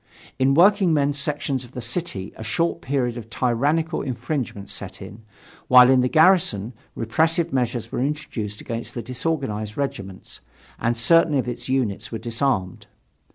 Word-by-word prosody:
In 135 +1 +3
workingmen's 165 -6 +4
sections 140 -2 -2
of 125 +1 -14
the - - -6
city 125 - -3
a - - -8
short 165 +10 -1
period 125 -3 -1
of 115 -2 -9
tyrannical 145 +8 0
infringements 125 -6 -4
set - - -6
in, 105 +4 -10 0.5
while 125 0 +8
in 130 -1 +5
the 125 - +1
garrison 155 - +3 0.2
repressive 160 +8 +1
measures 120 -3 -1
were - - -3
introduced 125 -8 -4
against 115 0 -6
the 120 - -4
disorganized 120 -5 -3
regiments, 95 -9 -5 0.4
and 115 +1 0
certain 155 +6 +4
of 130 -2 0
its 120 +1 -5
units 125 -7 -1
were 115 - -3
disarmed. 115 -4 -2
125 Hz, 150 wpm, -23 LUFS, 115-150 Hz, 0.5 s, while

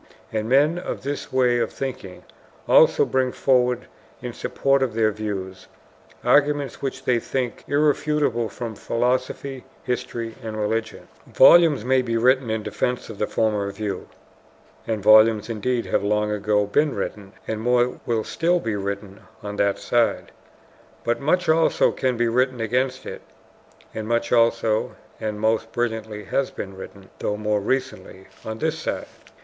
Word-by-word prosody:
And 110 0 -2
men 145 +6 +3
of 180 - -5
this 140 +1 -4
way 125 -2 +3
of - - -1
thinking 125 -9 -6 0.4
also - - +5
bring 130 -1 0
forward 125 -2 +1 0.3
in 125 -1 -6
support 135 +3 0
of 125 -4 -1
their 110 -1 +3
views 100 -3 -5 0.6
arguments 145 +1 +2
which 135 - -4
they 120 -2 +2
think 125 0 -3
irrefutable 145 -5 +1
from 115 +1 -6
philosophy, 125 +4 -2 0.2
history, 120 -2 -3
and 110 -2 -6
religion. 110 +1 -2 0.2
Volumes 160 -9 +6
may 130 0 +3
be 115 -2 -1
written 130 +1 +3
in 110 -1 -2
defense 125 +1 -2
of 105 - -11
the 105 - 0
former 105 -3 0
view 100 -1 -5 0.8
(and 110 -3 -2
volumes 110 +1 +5
indeed 120 +2 -1
have - - 0
long 105 +1 +1
ago 105 0 +1
been 145 +8 +1
written 100 -2 -5
and 110 -1 -3
more 125 +1 +1
will 115 -2 0
still 175 +2 +1
be 115 -8 -3
written 100 0 -5 0.2
on 105 0 -6
that 100 -1 +1
side), 120 -1 0 0.7
but 120 0 0
much 180 +6 +1
also 160 +1 +3
can 130 -2 -1
be 120 0 +2
written 125 +2 +1
against 130 +3 -1
it - - -7 0.7
(and 110 -1 -5
much 115 0 0
also, 115 -2 +2 0.2
and 105 -1 -4
most 110 +1 0
brilliantly, 110 -3 -3
has 130 +7 -1
been 95 -1 -7
written 95 0 -11
though 105 - -2
more 105 0 0
recently 130 -4 -3 0.2
on 110 0 -5
this 160 +4 -1
side). - - -3
115 Hz, 155 wpm, -23 LUFS, 105-130 Hz, 0.8 s, Volumes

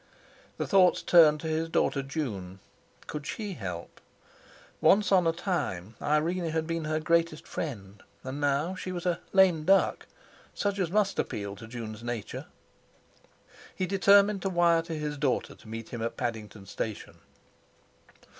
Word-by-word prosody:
His - - -2
thoughts 185 -3 +4
turned 155 -4 +6
to 160 - -4
his 160 +1 -1
daughter 140 -3 +1
June. 110 - -5 0.5
Could 150 -1 -6
she 210 -3 -4
help? 90 - -7 0.8
Once 205 +1 +4
on 180 -3 +5
a - - +4
time 165 - -3
Irene 165 +4 0
had 160 0 -1
been 165 -1 -3
her 155 0 0
greatest 165 0 +1
friend, 100 - -6 0.2
and 130 +3 -5
now 145 +5 +1
she 185 0 -6
was 175 -1 -5
a 175 -2 +1
"lame 185 -5 +4
duck," 195 +4 +3 0.5
such 200 -1 -1
as 180 -4 0
must 200 +1 +1
appeal 100 -1 -3
to 110 +3 -11
June's 115 -2 -7
nature! 120 -3 -5 1.3
He 185 - -1
determined 200 +1 +4
to 195 - -1
wire 170 -2 +3
to 165 0 -6
his 150 -1 -4
daughter 135 -4 0
to - - -18
meet 115 0 -7
him 120 - -6
at 115 - -3
Paddington 110 -4 -5
Station. 105 +2 -6
155 Hz, 155 wpm, -28 LUFS, 115-180 Hz, 1.3 s, turned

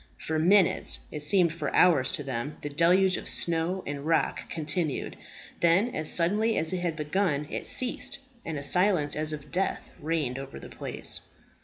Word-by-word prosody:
For 160 0 -3
minutes 185 +2 +3
it 150 - -6
seemed 170 +2 +3
for 155 -4 -4
hours 150 -8 +4
to 160 -5 -2
them 135 +2 -5
the 145 - -4
deluge 180 +5 +3
of - - -6
snow 170 +3 0
and 140 0 -5
rock 165 +2 -1
continued. 160 -1 -2 0.4
Then, 185 +8 +2
as 155 0 0
suddenly 210 +6 +1
as 160 +2 0
it 185 - -1
had 170 -2 -2
begun, 150 -1 -1
it - - -5
ceased, 260 +2 +2 0.3
and 160 -2 -5
a 140 - -6
silence 180 -1 +2
as 155 0 0
of 150 -2 -8
death 190 +2 -2
reigned 150 -5 -2
over 135 0 -9
the - - -11
place. - - 0
165 Hz, 175 wpm, -27 LUFS, 150-185 Hz, 0.4 s, hours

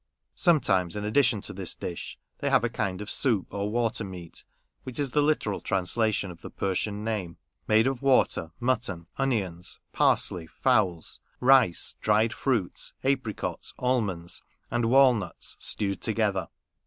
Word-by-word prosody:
Sometimes, 105 - +2
in 105 0 -3
addition 115 -1 +3
to - - -6
this 95 -4 -3
dish, 85 - -6 0.2
they - - 0
have - - +4
a 120 - +1
kind 100 -4 -2
of 105 - -5
soup, 115 -9 +1
or 100 0 -2
ler 115 +1 +1
meat" 90 -4 -9 0.4
(which 130 - -7
is 140 -3 0
the 150 - +3
literal 145 -9 0
translation 100 +1 0
of 85 - -13
the - - -8
Persian 100 +2 -2
name), 105 -7 -3 0.3
made 110 +1 +4
of 135 -2 -1
water, 130 -11 +2
mutton, 110 -9 -1
onions, 100 -11 -2
parsley, 85 -3 +2
fowls, 95 - 0 0.2
rice, 130 -9 +4
dried 110 +2 +3
fruits, 115 -10 -2
apricots, 130 -5 -2
almonds, 105 -10 -1 0.3
and 120 -1 +1
walnuts, 120 -7 +3
stewed 100 -2 -1
together. 105 -4 0
110 Hz, 140 wpm, -27 LUFS, 95-125 Hz, 0.4 s, have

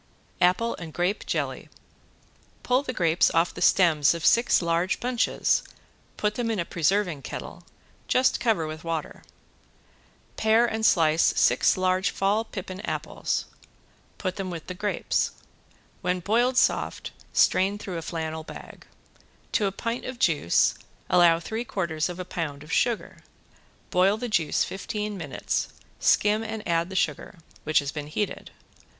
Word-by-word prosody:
~APPLE 185 +6 +3
AND 165 -3 -8
GRAPE 180 +4 -1
JELLY~ - - -3 0.9
Pull 250 +1 +2
the 280 - -4
grapes 170 -7 +3
off 165 +1 +2
the - - -8
stems 160 -5 +4
of 165 - -4
six 235 +1 +4
large 170 +2 0
bunches, 245 -1 +1 0.6
put 210 0 0
them 235 0 -2
in 225 - -1
a 170 - -1
preserving 175 -2 0
kettle, - - -7 0.5
just 255 +1 +3
cover 225 -9 +1
with 155 0 -7
water. 165 -2 -4 1.1
Pare 220 +2 +4
and 220 -1 +1
slice 160 -1 +3 0.2
six - - +4
large 185 +1 +1
fall 205 +3 +1
pippin 190 -3 -7
apples. - - -3 0.7
Put 185 -1 -3
them 195 -2 -3
with 170 -3 -6
the - - -6
grapes. 205 +3 -1 0.7
When 180 0 0
boiled 240 +7 +1
soft - - +1 0.2
strain 195 +2 +3
through 190 -4 -5
a - - -7
flannel 160 -1 -4
bag. - - -11 0.6
To 205 - +2
a - - -1
pint 230 +5 -4
of 255 -1 -6
juice 155 - +3 0.4
allow 170 -2 +5
three 220 +7 -4
quarters 170 -7 -2
of 180 0 -7
a 185 - -4
pound 150 -5 -4
of 150 - -7
sugar. 240 -3 0 0.7
Boil 190 +3 +3
the 245 +2 -4
juice 165 -8 +1
fifteen 210 +1 -4
minutes, 155 -8 -2 0.3
skim 210 +1 +3
and 220 -1 -5
add 170 0 +1
the 190 - -7
sugar, 160 0 -1 0.3
which 155 0 +1
has 140 -1 +2
been 150 -2 -6
heated. 200 +7 -3
185 Hz, 150 wpm, -26 LUFS, 165-215 Hz, 1.1 s, allow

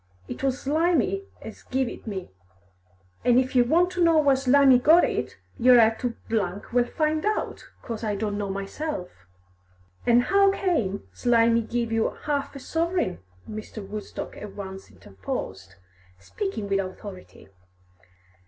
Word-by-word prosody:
It - - -7
was 265 0 0
Slimy 335 +6 +1 0.2
as - - -10
give 260 0 -1
it - - -9
me, 190 - -5 0.9
an' 245 -1 +4
if 260 0 +1
yer 245 - +6
want 345 +7 +3
to 360 -1 0
know 330 -1 +5
where 285 -3 +4
Slimy 265 -1 +5
got 320 +7 +6
it, - - -2 0.2
yer 250 +1 +7
'll - - +8
'ave 225 0 +4
to 245 -2 -3 0.6
well 245 0 +3
find 310 +3 -1
out, 425 0 -2 0.2
'cos 230 -1 -6
I 210 -2 -1
don't 205 0 -2
know 200 -1 -3
myself." 195 - -4 1.0
"And 240 0 +5
how 395 +4 +4
came 240 - -1
Slimy 235 -1 +3
to 225 - -10
give 235 -1 -2
you 225 0 +1
half 285 -1 -2
a - - -6
sovereign?" 325 - -1 0.3
Mr. 215 -1 -7
Woodstock 210 0 -7
at 210 -2 -9
once 190 -1 -8
interposed, 95 0 -7 0.4
speaking 220 - -5
with 195 0 +1
authority. 185 - -8
245 Hz, 155 wpm, -25 LUFS, 205-305 Hz, 1.0 s, ll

